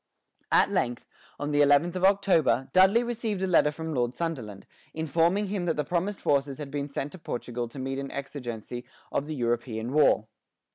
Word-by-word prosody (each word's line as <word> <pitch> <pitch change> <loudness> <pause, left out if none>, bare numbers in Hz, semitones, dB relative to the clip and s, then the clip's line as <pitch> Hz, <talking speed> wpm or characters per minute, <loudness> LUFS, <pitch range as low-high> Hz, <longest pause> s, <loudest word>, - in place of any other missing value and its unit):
At - - +4
length, 120 0 -1 0.3
on 145 +1 -2
the 145 0 +3
eleventh 145 +5 +4
of 185 - -3
October, 190 -9 +3
Dudley 190 +6 +6
received 225 -5 -2
a - - +3
letter 170 -5 +4
from 160 +1 -5
Lord 120 -2 0
Sunderland, 125 - -4 0.3
informing 165 +6 +1
him 190 -3 -2
that 165 - 0
the 150 - +1
promised 180 +6 -2
forces 140 -1 +1
had 145 -2 -7
been 145 0 -3
sent 140 0 -4
to 185 - -11
Portugal 120 -4 -4
to 115 - -13
meet 135 +1 -3
an 135 0 -5
exigency 120 -4 -6 0.3
of 140 - -1
the 155 - -4
European 120 -1 -2
war. 145 -7 +4
145 Hz, 185 wpm, -27 LUFS, 130-175 Hz, 0.3 s, Dudley